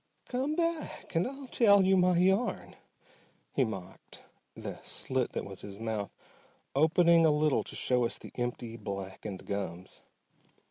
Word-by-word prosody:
"Come 265 +5 -1
back 335 -1 -2
and 165 +4 +2
I'll 275 +1 -7
tell 205 -6 +5
you 190 +1 +5
my 180 -1 +4
yarn," 190 +6 +1 0.8
he 135 - +3
mocked, 95 -5 -7 0.3
the - - -6
slit 130 -2 -2
that - - -3
was 100 -1 -8
his 100 0 -9
mouth 110 -3 -2 0.6
opening 165 +3 +5
a 160 - +6
little 150 -1 +2
to - - -8
show 125 -1 +2
us - - -1
the - - -11
empty, 120 -2 -4
blackened 100 -1 -6
gums. 95 -3 -5
140 Hz, 145 wpm, -31 LUFS, -, 0.8 s, a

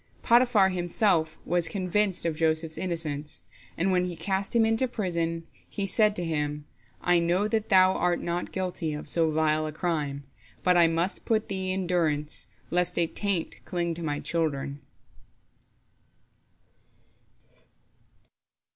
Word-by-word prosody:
" - - -32
Potiphar 235 -5 +4
himself 175 -2 +1
was 175 -1 +2
convinced 190 +1 +1
of 165 -2 0
Joseph's 160 0 +1
innocence, 155 -5 -3 0.4
and 185 +3 +1
when 180 -1 +2
he 180 -1 -4
cast 195 +5 -2
him 230 -1 +5
into 225 +3 +2
prison, 170 -7 -2 0.2
he 200 - -3
said 210 +2 +3
to 175 - -2
him, 150 -2 -2 0.4
"I 175 -1 +3
know 175 +5 +1
that 220 0 -1
thou 185 -1 +6
art 175 -2 0
not 175 +1 -3
guilty 180 -4 -3
of 150 - -8
so 165 -2 +2
vile 155 0 +1
a - - -4
crime, 150 -4 -2 0.4
but 180 -1 +4
I 170 -1 +6
must 170 +3 -1
put 220 -1 0
thee 190 -1 -2
in 185 0 -1
durance, 155 -4 0 0.2
lest 180 +1 +1
a 170 - +4
taint 190 0 -2
cling 170 -1 -2
to 165 - -7
my 145 -3 -2
children." 145 -4 -2
175 Hz, 145 wpm, -27 LUFS, 160-190 Hz, 0.4 s, thou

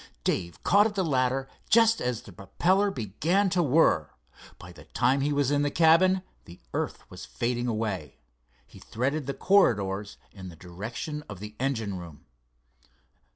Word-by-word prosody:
Dave 85 -2 -2
caught 205 +3 +5
at 210 - -8
the 190 -2 0
ladder 135 -2 0 0.2
just 230 0 +4
as 125 -2 -2
the 105 - -12
propeller 185 - +1
began 170 - 0
to 180 - +2
whir. 140 - +3 0.5
By - - -12
the - - -15
time 135 +2 +1
he 145 +2 0
was 145 -1 +1
in 145 0 +2
the 145 - +1
cabin 170 +4 +4 0.2
the 85 - -13
earth - - -4
was 90 0 -9
fading 120 0 -2
away. 110 - -3 0.5
He - - -16
threaded 135 +4 -3
the 140 - -3
corridors 105 - +2
in 95 -2 -10
the 85 - -12
direction 110 - -6
of 100 -3 -8
the 105 +1 -9
engine 115 -8 -2
room. 85 -4 -12
130 Hz, 160 wpm, -27 LUFS, 100-165 Hz, 0.5 s, caught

